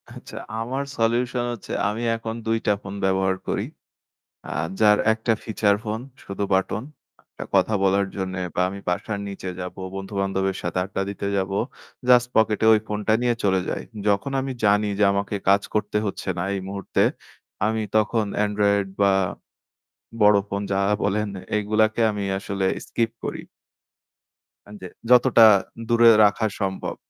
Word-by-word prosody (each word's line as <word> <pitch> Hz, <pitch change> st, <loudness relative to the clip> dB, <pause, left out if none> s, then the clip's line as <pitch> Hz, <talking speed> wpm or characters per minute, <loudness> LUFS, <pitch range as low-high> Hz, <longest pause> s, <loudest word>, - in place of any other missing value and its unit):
আচ্ছা -, -, -11 dB, 0.2 s
আমার 130 Hz, +5 st, -2 dB
সলিউশন 120 Hz, +2 st, +1 dB
হচ্ছে 115 Hz, -, -9 dB, 0.2 s
আমি 110 Hz, +3 st, -4 dB
এখন 115 Hz, 0 st, -5 dB
২ 115 Hz, 0 st, +2 dB
টা 105 Hz, -, +5 dB
ফোন 100 Hz, -, -7 dB
ব্যবহার 95 Hz, 0 st, +1 dB
করি। -, -, -1 dB, 0.9 s
আ -, -, -5 dB, 0.3 s
যার 105 Hz, -1 st, +6 dB
১ 110 Hz, -, -4 dB
টা 115 Hz, -, +4 dB
ফিচার 105 Hz, -2 st, +2 dB
ফোন 110 Hz, +1 st, -3 dB, 0.2 s
শুধু 100 Hz, +1 st, -5 dB
বাটন 95 Hz, +3 st, 0 dB, 0.6 s
এ -, -, -2 dB
কথা 95 Hz, +3 st, +3 dB
বলার 100 Hz, +1 st, +3 dB
জন্যে 95 Hz, -1 st, -3 dB
বা -, -, 0 dB
আমি 100 Hz, +1 st, -7 dB
বাসার 100 Hz, +3 st, -2 dB
নিচে 100 Hz, -1 st, -6 dB
যাবো, 90 Hz, +1 st, -7 dB
বন্ধু-বান্ধবের 95 Hz, -1 st, -2 dB
সাথে -, -, -2 dB
আড্ডা 95 Hz, 0 st, -3 dB
দিতে 100 Hz, -, -5 dB
যাবো। 95 Hz, +1 st, -1 dB, 0.5 s
জাস্ট 125 Hz, -1 st, +6 dB
পকেটে 110 Hz, 0 st, +3 dB
ওই 105 Hz, -, +2 dB
ফোনটা 105 Hz, +1 st, -1 dB
নিয়ে 120 Hz, -1 st, +2 dB
চলে 95 Hz, -1 st, +3 dB
যাই। -, -, -3 dB, 0.3 s
যখন 100 Hz, +7 st, +1 dB
আমি 130 Hz, 0 st, -3 dB
জানি 105 Hz, +1 st, +3 dB
যে 105 Hz, -, +4 dB
আমাকে 100 Hz, +1 st, -2 dB
কাজ 100 Hz, +1 st, +5 dB
করতে 105 Hz, 0 st, -1 dB
হচ্ছে 100 Hz, -, -5 dB
না -, -, -1 dB
এই 100 Hz, -, -2 dB
মুহূর্তে 100 Hz, 0 st, -1 dB, 0.6 s
আমি 110 Hz, 0 st, 0 dB
তখন 110 Hz, +1 st, +2 dB, 0.2 s
এন্ড্রয়েড 100 Hz, -1 st, +1 dB
বা 100 Hz, -1 st, +5 dB, 1.1 s
বড় 105 Hz, 0 st, +7 dB
ফোন 100 Hz, 0 st, -2 dB
যা 95 Hz, -, +1 dB, 0.2 s
বলেন 105 Hz, +1 st, 0 dB, 0.3 s
এগুলাকে 110 Hz, +2 st, +1 dB
আমি 105 Hz, -1 st, -3 dB
আসলে 100 Hz, -1 st, -2 dB, 0.2 s
স্কিপ 115 Hz, -1 st, 0 dB
করি। -, -, -4 dB, 1.3 s
হ্যাঁ 105 Hz, 0 st, -11 dB
যে 95 Hz, -, -6 dB, 0.2 s
যতটা 125 Hz, -2 st, +7 dB, 0.4 s
দূরে 115 Hz, 0 st, +6 dB
রাখা 105 Hz, +2 st, +3 dB
সম্ভব। 95 Hz, -2 st, -3 dB
105 Hz, 155 wpm, -23 LUFS, 100-110 Hz, 1.3 s, বড়